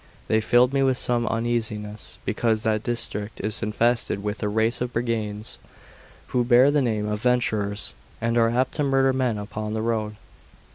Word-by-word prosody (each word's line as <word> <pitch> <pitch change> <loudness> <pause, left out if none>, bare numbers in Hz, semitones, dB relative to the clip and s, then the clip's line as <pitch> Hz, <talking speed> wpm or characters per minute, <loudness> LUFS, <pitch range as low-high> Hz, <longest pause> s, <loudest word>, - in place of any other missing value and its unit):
They 110 0 +2
filled 120 +3 +4
me 135 - +2
with 130 -1 +2
some 120 -2 0
uneasiness, 110 -2 -2
because 110 -2 0
that 110 -1 +1
district 110 -3 -2
is 110 +1 -2
infested 115 -1 0
with 105 +1 -3
a 105 - 0
race 110 +3 +1
of 125 0 -2
brigands, 110 -3 -3 0.7
who 125 - +1
bear 125 +3 +5
the 145 0 +2
name 110 -4 0
of 105 0 -2
Venturers, 110 - 0 0.3
and 115 +1 0
are 115 -1 +4
apt 125 +3 0
to 150 - +1
murder 135 -1 +3
men 125 -4 0
upon 105 +1 -5
the 110 - -1
road. 110 -2 -1
115 Hz, 175 wpm, -24 LUFS, 105-125 Hz, 0.7 s, bear